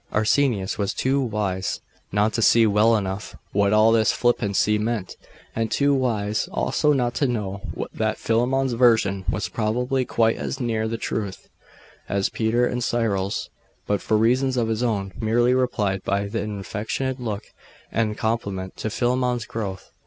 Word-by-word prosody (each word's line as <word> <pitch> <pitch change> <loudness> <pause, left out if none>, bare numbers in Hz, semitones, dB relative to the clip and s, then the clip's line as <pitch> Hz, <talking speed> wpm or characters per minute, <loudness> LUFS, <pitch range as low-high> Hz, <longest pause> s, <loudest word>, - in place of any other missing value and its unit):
Arsenius 110 -2 +1
was 100 -1 -1
too 135 +2 +1
wise 100 -6 -2 0.3
not 105 +2 +2
to 115 - 0
see 115 +1 +6
well 110 +2 +4
enough 95 +1 -4 0.2
what 100 0 +2
all 110 +1 +5
this 110 -1 +4
flippancy 105 -3 +1
meant; 110 -3 -2 0.4
and 115 0 -1
too 140 +5 +2
wise, 110 -6 0
also, 70 - +1
not 125 -4 +1
to 140 - +1
know 100 -5 -3 0.3
that 110 0 -1
Philammon's 125 +3 +1
version 110 -5 +3
was 105 - -1
probably 125 +4 0
quite 115 -2 +1
as 135 - -4
near 115 -3 -1
the 115 +1 -3
truth 105 -4 -4 0.6
as 100 -1 +1
Peter's 120 +2 +1
and 125 0 -2
Cyril's; 100 -5 -1 0.3
but 105 -1 0
for 110 - +1
reasons 125 +4 +2
of 115 -2 +1
his 110 +1 -1
own, 100 -6 -1
merely 120 +3 +2
replied 105 -7 0
by 100 +1 0
an 105 0 -3
affectionate 115 +6 -3
look, 110 -4 -4 0.5
and 110 -1 0
a - - -11
compliment 100 -5 -2
to 110 - -3
Philammon's 125 0 0
growth. 100 -4 -5
110 Hz, 160 wpm, -23 LUFS, 100-120 Hz, 0.6 s, see